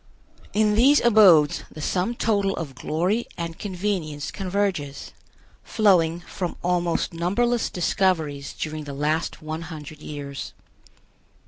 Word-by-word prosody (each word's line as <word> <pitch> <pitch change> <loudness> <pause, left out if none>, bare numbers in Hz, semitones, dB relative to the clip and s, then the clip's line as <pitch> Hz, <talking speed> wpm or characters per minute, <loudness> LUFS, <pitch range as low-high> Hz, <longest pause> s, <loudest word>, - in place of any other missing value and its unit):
In 210 0 +2
these 265 +7 +6
abodes 195 -10 +6
the - - -10
sum 185 +9 -1
total 200 -4 +1
of 150 -5 -5
glory 180 - -1
and 170 -1 -5
convenience 180 -7 -3
converges, 185 -7 -2 0.5
flowing 175 -6 +3
from 180 0 -5
almost 175 -1 0
numberless 225 +8 0
discoveries 160 -6 0
during 155 -1 -5
the 140 -1 -6
last 155 +3 -1
one 155 +1 -4
hundred 155 -2 -9
years. 140 -2 -7
175 Hz, 115 wpm, -24 LUFS, 155-200 Hz, 0.5 s, these